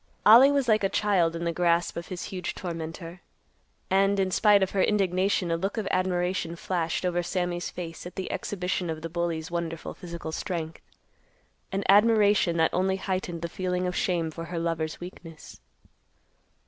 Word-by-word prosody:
Ollie 245 +6 +9
was 280 -3 +1
like 215 -2 +3
a 195 - +2
child 185 -6 +2
in 170 - -4
the 170 0 -1
grasp 170 0 +1
of 170 +1 -6
his 180 -1 -6
huge 180 -2 -5
tormentor, 165 0 -6 0.7
and, 195 +1 +3
in 190 -1 +1
spite 205 0 +5
of 190 - -1
her 195 - +1
indignation, 190 -3 +1
a - - +2
look 195 +6 -3
of 215 -3 -2
admiration 180 -2 0
flashed 170 0 -2
over 175 -1 +1
Sammy's 175 0 -2
face 170 -1 -7
at 180 - -12
the 190 -1 -4
exhibition 180 -2 -2
of 160 0 -5
the 165 - -4
bully's 170 -1 -3
wonderful 165 -1 -4
physical 170 -3 -7
strength; 165 -2 -4 0.9
an 195 0 -1
admiration, 205 -3 +4
that 160 0 +2
only 190 +1 +1
heightened 185 -3 -3
the - - -1
feeling 180 +1 -2
of 180 0 -2
shame 170 -3 0
for 165 +1 -7
her 170 0 -5
lover's 165 -1 -2
weakness. 170 -2 -11
180 Hz, 175 wpm, -27 LUFS, 170-190 Hz, 0.9 s, Ollie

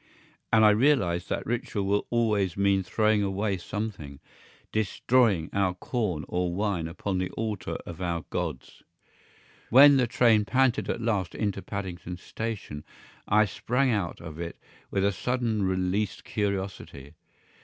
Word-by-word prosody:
And 110 -1 +6
I 105 - +8
realised 105 -8 +2
that - - -2
ritual 120 -4 -2
will 100 +1 0
always 105 -6 +1
mean 100 -1 +3
throwing 105 +3 +1
away 100 0 -1
something; 90 -8 -5 0.5
DESTROYING 110 -3 +2
our 95 -2 +1
corn 90 - -2
or 90 0 -1
wine 95 -3 -1
upon 95 +3 -3
the 90 - -1
altar 110 -3 -3
of 85 0 -8
our 85 -2 -2
gods. 80 -7 -4 0.9
When 140 +3 +8
the 125 -2 +2
train 115 -2 +4
panted 130 +2 +1
at - - -2
last 105 -7 -1
into 100 -2 -2
Paddington 90 -3 -6
Station 100 -7 -6 0.4
I 105 +1 +4
sprang 125 +7 0
out 100 -6 -2
of 80 -2 -9
it 85 0 -5 0.3
with 95 0 0
a 100 - +3
suddenly 115 +1 -1
released 95 +2 -1
curiosity. 95 -8 -4
100 Hz, 140 wpm, -27 LUFS, 90-110 Hz, 0.9 s, I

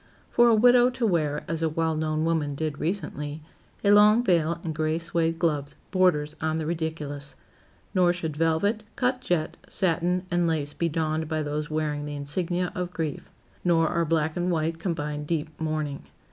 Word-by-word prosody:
For 240 0 +5
a 230 - +6
widow 245 +2 +6
to 250 -1 -2
wear, 155 -7 +1
as 165 0 -3
a 160 - +2
well 160 0 0
known 155 0 0
woman 155 -4 0
did 150 0 -3
recently, 155 -4 -3 0.4
a 200 - +5
long 210 +3 +6
veil 170 -5 +2
and 160 - -3
gray 155 +1 0
suède 165 -1 0
gloves, 150 -4 -1 0.2
borders 155 -6 +2
on 160 0 0
the 160 - -2
ridiculous. 155 -3 -4 0.6
Nor 180 -2 +4
should 165 -4 -4
velvet, 165 +7 +1
cut 250 -1 0
jet, 175 -8 -1
satin 180 0 0
and 175 -1 +2
lace 150 -3 -1
be 170 - -1
donned 160 0 -1
by 155 -1 -1
those 150 0 -3
wearing 150 -1 -2
the 145 - -5
insignia 175 +5 -1
of 180 -1 -3
grief. 160 -4 -4 0.3
Nor 165 -2 +3
are 170 -1 +1
black 160 -1 0
and 180 0 0
white 165 -1 0
combined 150 -4 -3
deep 155 -2 -1
mourning. 155 -3 -2
160 Hz, 175 wpm, -26 LUFS, 155-175 Hz, 0.6 s, a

